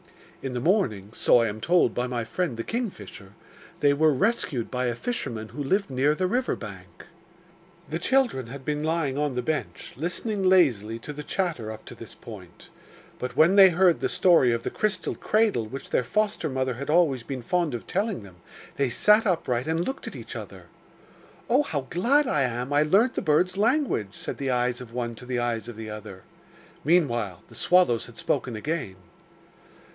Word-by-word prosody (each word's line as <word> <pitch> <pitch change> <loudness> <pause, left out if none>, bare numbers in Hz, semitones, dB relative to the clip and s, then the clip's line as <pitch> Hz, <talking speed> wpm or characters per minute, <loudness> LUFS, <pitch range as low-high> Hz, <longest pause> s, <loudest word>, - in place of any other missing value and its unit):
In 135 -2 -4
the 125 - -2
morning 120 - 0
so 120 - +4
I 115 - +1
am 110 +1 -5
told 170 -5 +3
by 125 +1 -1
my 120 -2 -2
friend 145 +1 -2
the 115 - -3
kingfisher 195 - -5 0.5
they 145 -1 +5
were 155 +2 +4
rescued 145 - 0
by 125 0 -1
a 120 - -1
fisherman 115 - -4
who 145 - -5
lived 195 +5 0
near 140 +4 +2
the 185 - -1
river 250 +7 0
bank.' 95 -3 -10 0.8
The 160 - -3
children 240 - +1
had 135 +2 -9
been 150 -1 -1
lying 155 -3 -1
on 150 -2 0
the 125 0 -2
bench, 155 +2 -4
listening 190 - -3
lazily 135 - +3
to 150 +6 -8
the 150 - -7
chatter 155 - -2
up 110 0 -10
to - - -9
this - - -11
point; - - -12 0.5
but 125 0 -5
when 170 +5 +5
they 195 -2 +9
heard 175 0 +3
the - - -1
story 170 -9 +4
of 115 0 -1
the - - -3
crystal 215 -1 -1
cradle 210 - +1
which 135 +5 -8
their - - +2
foster 205 - 0
mother 130 -1 -1
had 140 +5 -7
always 155 -6 +3
been 130 0 -6
fond 170 -1 0
of 115 - -7
telling 200 - -2
them, 95 -3 -14 0.4
they 140 -2 +1
sat 210 - +4
upright 135 -9 0
and 165 +2 0
looked 265 - -5
at - - -7
each - - -8
other. - - -8 0.8
'Oh, 255 +5 +4
how 155 - -2
glad 265 - +3
I 150 - +1
am 125 +1 -1
I 145 - +4
learnt 200 +11 +3
the - - -2
birds' 175 +5 +2
language!' 220 - +1
said - - -6
the 135 -1 -2
eyes 125 0 0
of 120 -2 -10
one 120 -1 -3
to 120 +2 -11
the 125 -1 -2
eyes 120 -1 -1
of 120 - -7
the 110 -1 -7
other. 100 -3 -9 0.6
Meanwhile 120 - +1
the - - -17
swallows 175 -12 +3
had 115 - -15
spoken 125 - -1
again. 145 - -3
140 Hz, 195 wpm, -26 LUFS, 120-180 Hz, 0.8 s, they